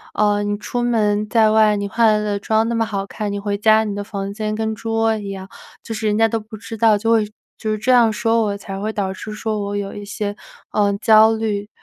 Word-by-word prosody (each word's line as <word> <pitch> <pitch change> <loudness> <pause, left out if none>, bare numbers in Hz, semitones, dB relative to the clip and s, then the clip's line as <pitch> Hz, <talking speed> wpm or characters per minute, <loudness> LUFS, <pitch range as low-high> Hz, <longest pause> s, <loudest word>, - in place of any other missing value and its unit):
呃， 205 -1 +2
“你 205 0 -1
出 240 +3 -3
门 210 -3 +1
在 220 -1 +4
外， 215 -1 +4
你 200 0 -2
化 230 +3 +2
了 210 0 +1
的 205 -1 -1
妆 220 +2 +1
那 235 - -1
么 230 - +2
好 200 -3 -3
看， 205 +1 -4
你 200 - -3
回 200 0 -2
家 220 +1 +4
你 210 -2 -3
的 205 - -4
房 200 -1 -5
间 215 0 -3
跟 220 0 -2
猪 225 +1 -5
窝 225 0 +2
一 205 -2 -6
样。” 190 -1 -7 0.4
就 225 - -6
是 215 0 -2
人 210 0 +1
家 225 0 +4
都 225 +1 -1
不 215 +1 -11
知 225 +1 -8
道 220 -1 +4
就 225 +2 0
会 225 -2 +3 0.3
就 215 - -3
是 215 - -1
这 235 +5 +1
样 240 -3 +5
说 225 +1 +1
我， 205 -2 -1
才 195 -1 -7
会 215 +2 -2
导 195 -3 -2
致 215 +3 -8
说 215 0 -3
我 205 0 -3
有 200 -1 -4
一 205 - -7
些， 205 0 -4 0.4
呃， 205 -1 +2
焦 220 0 +6
虑。 210 -2 -2
215 Hz, 280 characters per minute, -20 LUFS, 205-225 Hz, 0.4 s, 焦